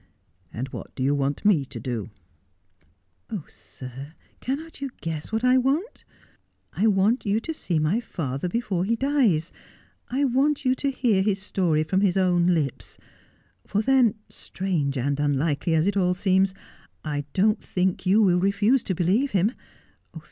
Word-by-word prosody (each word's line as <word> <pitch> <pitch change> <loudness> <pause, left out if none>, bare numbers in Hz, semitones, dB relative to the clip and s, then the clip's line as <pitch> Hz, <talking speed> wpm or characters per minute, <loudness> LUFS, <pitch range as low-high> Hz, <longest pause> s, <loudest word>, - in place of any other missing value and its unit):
' 80 +2 -42
And 125 +4 -4
what - - -9
do 130 - -3
you 140 +2 +2
want 140 +4 -1
me 185 -9 +4
to 130 -2 -8
do? 115 -2 -4 0.4
' 90 -3 -40
' 90 -2 -46
Oh, 200 -8 -4
sir, 135 +4 -10 0.2
cannot 290 +3 -5
you 275 - -3
guess 160 0 -4
what 220 +1 -1
I 255 +1 +5
want 285 - -1 0.7
1 205 - 0
I - - +6
want 210 +4 +2
you 205 +1 +1
to 320 +8 -5
see 180 - -2
my 155 +8 +1
father 160 - -4
before 195 -4 -1
he 225 +5 +1
dies. 230 - +1 0.6
I 265 +3 0
want 280 +2 +1
you 255 - +4
to 275 +2 -1
hear 240 -7 +1
his 195 0 +1
story 180 -6 0
from 190 +5 0
his 195 -2 +2
own 175 -2 +3
lips; 155 -7 -1 0.7
for 205 +2 0
then, 255 -4 +4
si - - -13
range 160 -8 0
and 140 +3 -1
unlikely 145 +2 +1
as 160 +1 +2
it 200 0 +1
all 180 -2 +2
seems, 190 +1 +2 0.5
I 145 -2 -2
don't 210 +3 +2
think 185 0 -1
you 200 +4 +4
will 180 -3 +4
refuse 205 +6 +2
to 190 - -1
believe 200 +11 +1
him. 200 +3 +3
185 Hz, 175 wpm, -25 LUFS, 145-225 Hz, 0.7 s, I